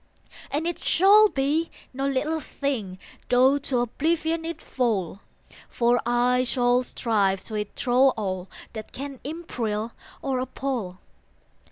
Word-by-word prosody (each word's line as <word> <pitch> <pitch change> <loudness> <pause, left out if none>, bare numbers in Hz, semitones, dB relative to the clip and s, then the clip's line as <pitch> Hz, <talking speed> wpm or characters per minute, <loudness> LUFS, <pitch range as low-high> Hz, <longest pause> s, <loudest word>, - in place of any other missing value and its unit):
And 300 +3 -1
it 345 0 -2
shall 415 +4 +6
be 295 +3 0 0.2
no 270 +2 -1
little 300 +4 0
thing, 245 -12 -3 0.3
Tho 260 +3 +5
to 260 -3 0
oblivion 320 +6 0
it 335 0 -4
fall, 205 -8 -1 0.5
For 240 0 +2
I 245 +1 +3
shall 245 0 +2
strive 205 -6 0
to 220 - -9
it 210 -1 -3
thro 255 +2 +4
all 185 -3 -3 0.2
That 220 -1 -8
can 275 -1 -6
imperil 235 -8 -3 0.3
or 265 -2 0
appal. 255 -7 -3
255 Hz, 130 wpm, -25 LUFS, 225-285 Hz, 0.5 s, shall